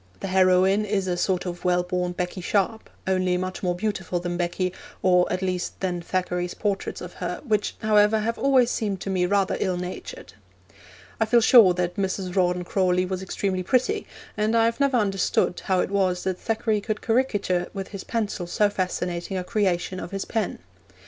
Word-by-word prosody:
The 195 Hz, -, -4 dB
heroine 185 Hz, +2 st, +4 dB
is 200 Hz, -2 st, -1 dB
a 180 Hz, -, 0 dB
sort 185 Hz, +1 st, 0 dB
of 175 Hz, -1 st, -5 dB
well 180 Hz, 0 st, +2 dB
born 180 Hz, 0 st, -2 dB
Becky 180 Hz, +1 st, -4 dB
Sharp, 205 Hz, +4 st, -1 dB, 0.2 s
only 185 Hz, -1 st, +1 dB
much 185 Hz, 0 st, -4 dB
more 180 Hz, -2 st, 0 dB
beautiful 190 Hz, -2 st, -2 dB
than 175 Hz, 0 st, -3 dB
Becky, 175 Hz, +1 st, -1 dB, 0.3 s
or 180 Hz, -1 st, +4 dB
at 185 Hz, +1 st, -1 dB
least 180 Hz, -1 st, -2 dB
than 180 Hz, -2 st, -2 dB
Thackeray's 180 Hz, 0 st, -2 dB
portraits 200 Hz, -2 st, -2 dB
of -, -, -8 dB
her, -, -, -3 dB
which, 210 Hz, -4 st, 0 dB
however, 210 Hz, 0 st, +4 dB
have 230 Hz, +2 st, -2 dB
always 260 Hz, -3 st, +4 dB
seemed 205 Hz, -4 st, -2 dB
to 195 Hz, -, -3 dB
me 180 Hz, -1 st, +1 dB
rather 195 Hz, 0 st, +1 dB
ill 185 Hz, -1 st, 0 dB
natured. 185 Hz, -, -7 dB, 0.9 s
I 225 Hz, -, +3 dB
feel 235 Hz, +2 st, +4 dB
sure 220 Hz, -6 st, +7 dB
that 175 Hz, -1 st, -2 dB
Mrs. 190 Hz, -1 st, -2 dB
Rawdon 180 Hz, -1 st, +2 dB
Crawley 180 Hz, 0 st, +1 dB
was 185 Hz, 0 st, -3 dB
extremely 190 Hz, 0 st, -2 dB
pretty, 265 Hz, -, 0 dB, 0.3 s
and 215 Hz, +2 st, +1 dB
I 225 Hz, -, +4 dB
have 230 Hz, +3 st, 0 dB
never 275 Hz, -2 st, +3 dB
understood 195 Hz, -4 st, +1 dB
how 185 Hz, -1 st, +2 dB
it -, -, -3 dB
was 185 Hz, -3 st, +1 dB
that 185 Hz, -1 st, -2 dB
Thackeray 220 Hz, -1 st, 0 dB
could 215 Hz, 0 st, -3 dB
caricature 205 Hz, -7 st, +1 dB
with 195 Hz, -1 st, -5 dB
his 200 Hz, -2 st, -7 dB
pencil 210 Hz, -6 st, -2 dB
so 205 Hz, +3 st, +2 dB
fascinating 180 Hz, -1 st, -2 dB
a 180 Hz, -, -2 dB
creation 185 Hz, -3 st, 0 dB
of 170 Hz, -, -6 dB
his 195 Hz, 0 st, -4 dB
pen. 220 Hz, -4 st, -2 dB
190 Hz, 190 wpm, -25 LUFS, 180-210 Hz, 0.9 s, sure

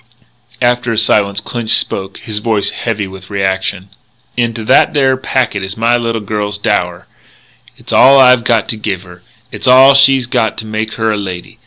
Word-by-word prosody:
After 120 Hz, 0 st, +1 dB
a 115 Hz, -, -2 dB
silence, 100 Hz, -3 st, +1 dB
Clinch 115 Hz, 0 st, -1 dB
spoke, 95 Hz, 0 st, -4 dB
his 105 Hz, -2 st, -4 dB
voice 105 Hz, -2 st, -1 dB
heavy 105 Hz, -1 st, -3 dB
with 95 Hz, 0 st, -12 dB
reaction: 95 Hz, -1 st, -2 dB, 0.5 s
"Into 115 Hz, -2 st, -2 dB
that -, -, +3 dB
there 135 Hz, -2 st, +2 dB
packet 130 Hz, -5 st, -2 dB
is 95 Hz, +2 st, -6 dB
my 115 Hz, +2 st, +2 dB
little 115 Hz, -2 st, -2 dB
girl's 105 Hz, 0 st, -4 dB
dower. 95 Hz, -5 st, -2 dB, 0.7 s
It's -, -, -7 dB
all 135 Hz, +1 st, +6 dB
I 125 Hz, -1 st, +7 dB
got 115 Hz, -2 st, 0 dB
to 110 Hz, -, -3 dB
give 100 Hz, -4 st, -4 dB
her. 90 Hz, -1 st, -15 dB, 0.3 s
It's -, -, -6 dB
all 130 Hz, +2 st, +7 dB
she's 135 Hz, -2 st, +4 dB
got 110 Hz, -2 st, -1 dB
to 110 Hz, -, -6 dB
make 110 Hz, 0 st, -4 dB
her 110 Hz, -1 st, -1 dB
a 105 Hz, -, -2 dB
lady. 95 Hz, -3 st, -7 dB
110 Hz, 180 wpm, -13 LUFS, 100-120 Hz, 0.7 s, I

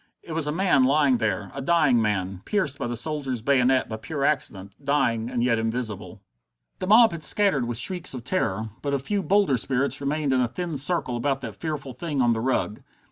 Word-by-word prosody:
It -, -, -10 dB
was 160 Hz, -2 st, -1 dB
a -, -, 0 dB
man 175 Hz, -5 st, +3 dB
lying 140 Hz, -1 st, +3 dB
there, 105 Hz, -3 st, -2 dB
a 140 Hz, -, -5 dB
dying 140 Hz, -5 st, +3 dB
man, 95 Hz, -3 st, -2 dB
pierced 185 Hz, -10 st, 0 dB
by -, -, -2 dB
the 120 Hz, -, -3 dB
soldier's 130 Hz, -2 st, -2 dB
bayonet 130 Hz, -1 st, +3 dB
by 110 Hz, -, -5 dB
pure 140 Hz, +6 st, -3 dB
accident, 100 Hz, -9 st, -2 dB
dying 120 Hz, -5 st, 0 dB
and 120 Hz, -2 st, -1 dB
yet 115 Hz, -2 st, +2 dB
invisible. 110 Hz, -3 st, -4 dB, 0.6 s
The 185 Hz, -, -3 dB
mob 225 Hz, +2 st, +7 dB
had 165 Hz, -2 st, -7 dB
scattered 190 Hz, -, +2 dB
with 120 Hz, -1 st, -2 dB
shrieks 180 Hz, +3 st, +1 dB
of 125 Hz, -, -7 dB
terror, 110 Hz, -, -1 dB
but 140 Hz, -1 st, -1 dB
a -, -, +2 dB
few 200 Hz, +10 st, -2 dB
bolder 195 Hz, -9 st, +2 dB
spirits 135 Hz, +3 st, -1 dB
remained 145 Hz, 0 st, 0 dB
in 130 Hz, -, +2 dB
a 125 Hz, -, +1 dB
thin 170 Hz, +5 st, -5 dB
circle 140 Hz, -2 st, 0 dB
about 135 Hz, +3 st, -1 dB
that 115 Hz, -5 st, -7 dB
fearful 150 Hz, -5 st, -5 dB
thing 145 Hz, +3 st, -4 dB
on 120 Hz, -2 st, +3 dB
the 110 Hz, -, -2 dB
rug. 120 Hz, -4 st, -1 dB
135 Hz, 210 wpm, -25 LUFS, 115-155 Hz, 0.6 s, mob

